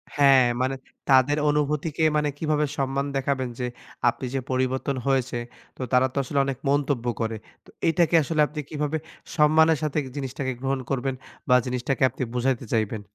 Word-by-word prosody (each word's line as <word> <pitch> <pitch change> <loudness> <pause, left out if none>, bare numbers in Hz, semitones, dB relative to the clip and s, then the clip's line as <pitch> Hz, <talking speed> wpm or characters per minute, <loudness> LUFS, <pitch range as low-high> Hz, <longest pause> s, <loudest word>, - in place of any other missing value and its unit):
হ্যাঁ। 135 -3 +6 0.2
মানে 130 +1 0 0.3
তাদের 135 +2 +5
অনুভূতিকে 150 +2 0
মানে 150 0 +1
কিভাবে 155 -1 +1
সম্মান 135 +1 0
দেখাবেন? 135 -2 -1
যে 125 - -1 0.4
আপনি 130 - -5
যে 135 - 0
পরিবর্তন 130 +1 0
হয়েছে? 130 -2 +1 0.4
তো - - -8
তারা 125 +1 +5
তো - - -7
আসলে 140 +2 -1
অনেক 135 -2 -3
মন্তব্য 140 -3 +1 0.2
করে। 110 0 -1 0.3
তো - - -19 0.2
এইটাকে 170 0 +3
আসলে 155 +1 0
আপনি 150 +1 -7
কিভাবে 150 +1 -2 0.4
সম্মানের 155 +1 +5
সাথে 155 -1 -1 0.2
জিনিসটাকে 130 -1 -3
গ্রহণ 135 0 -1
করবেন? 135 0 -1 0.3
বা 125 - +7
জিনিসটাকে 125 +1 -1
আপনি - - -5
বুঝাইতে 125 0 0
চাইবেন? 110 -1 0
135 Hz, 160 wpm, -25 LUFS, 130-150 Hz, 0.4 s, বা